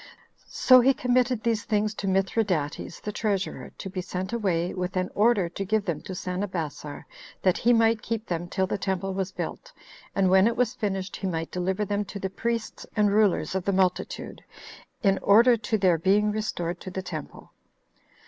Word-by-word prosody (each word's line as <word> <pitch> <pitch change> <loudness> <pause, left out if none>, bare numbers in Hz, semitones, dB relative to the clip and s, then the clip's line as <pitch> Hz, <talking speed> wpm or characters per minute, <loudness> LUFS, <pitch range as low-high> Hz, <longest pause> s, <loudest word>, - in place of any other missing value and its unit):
So 255 -1 +6
he 265 +2 +4
committed 250 -2 +1
these 225 -3 0
things 210 -1 0
to 205 - -4
Mithridates, 190 -5 0
the 210 - -4
treasurer, 200 -3 -2
to - - -6
be 185 -1 -4
sent 185 +3 -5
away, 180 -6 0
with 185 0 -3
an 185 0 -1
order 210 -4 +3
to 185 +3 -4
give 210 +1 0
them 165 -6 -2
to 190 - -7
Sanabassar, 180 -6 -4 0.4
that 185 -2 +3
he 240 - +3
might 225 -1 +3
keep 225 -1 -3
them 175 0 -3
till 190 +1 0
the 195 - -3
temple 190 0 -2
was 190 0 -2
built; - - -6 0.4
and 190 -2 +3
when 190 +2 +6
it 235 - -1
was 245 -2 +1
finished, 195 -3 -3
he 195 - -3
might 165 -2 -3
deliver 185 +3 -1
them 205 +1 -1
to 200 - -7
the 190 -1 -4
priests 230 +2 -3
and 210 -2 +3
rulers 210 -4 +2
of 190 -1 -1
the 200 - +1
multitude, 185 -1 -1 0.6
in 195 -2 +3
order 235 +4 +6
to 220 0 -1
their 185 -4 +3
being 205 +4 +3
restored 175 -5 -3
to - - -7
the 190 +1 -5
temple. 155 -5 -8
195 Hz, 185 wpm, -26 LUFS, 185-215 Hz, 0.6 s, So